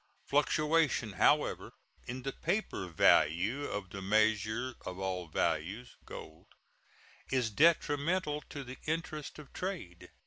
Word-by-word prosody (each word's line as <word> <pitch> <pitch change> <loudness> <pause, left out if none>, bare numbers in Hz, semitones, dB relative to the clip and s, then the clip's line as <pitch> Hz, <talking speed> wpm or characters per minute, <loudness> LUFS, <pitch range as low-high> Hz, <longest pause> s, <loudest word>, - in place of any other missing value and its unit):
Fluctuation, 150 -5 +2
however, - - +2 0.3
in 125 +1 -5
the 135 0 -3
paper 200 - -2
value 90 - +3
of 100 -6 -4
the 100 - -6
measure 110 +4 +2
of 90 - -6
all 95 -2 -3
values 95 +9 -1
(gold) 80 +1 -10 0.8
is 125 -4 +1
detrimental 150 - +2
to 140 - -6
the 130 0 -9
interests 155 -2 -3
of 150 -3 -12
trade. 175 - -5
125 Hz, 115 wpm, -32 LUFS, 95-150 Hz, 0.8 s, value